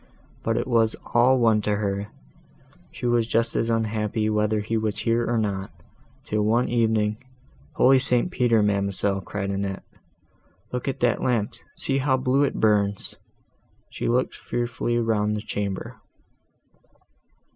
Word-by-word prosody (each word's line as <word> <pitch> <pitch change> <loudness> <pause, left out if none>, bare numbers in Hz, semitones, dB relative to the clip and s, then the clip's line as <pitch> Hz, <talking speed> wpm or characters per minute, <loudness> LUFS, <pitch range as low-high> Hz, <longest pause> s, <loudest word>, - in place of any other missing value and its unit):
but - - 0
it - - -1
was 115 -1 +2 0.2
all 125 +2 +5
one 115 -3 +3
to 105 0 0
her; 100 0 -2 0.8
she - - -7
was 120 -2 +2
just 115 0 0
as 115 - 0
unhappy 110 -1 0
whether 105 0 +1
he 105 +2 -3
was 110 -2 -1
here 115 +1 +1
or 120 - +1
not, 100 -3 -2 0.6
till 105 0 -1
one 115 +4 +2
evening, 110 -3 +1 0.6
Holy 130 +1 +5
St. 125 +5 +1
Peter! 115 -7 +3
ma'amselle," 100 -1 0
cried 100 0 -4
Annette, 100 0 -3 0.9
"look 125 +1 -4
at 135 0 -3
that 120 -2 +2
lamp, 115 -5 0 0.2
see 135 0 0
how 130 -1 +2
blue 130 +2 +1
it 140 - +1
burns!" 100 -2 +1 0.8
She - - -4
looked 125 +2 +1
fearfully 120 0 -2
round 105 -2 +1
the - - -4
chamber. 100 -3 -4
110 Hz, 145 wpm, -24 LUFS, 105-120 Hz, 0.9 s, all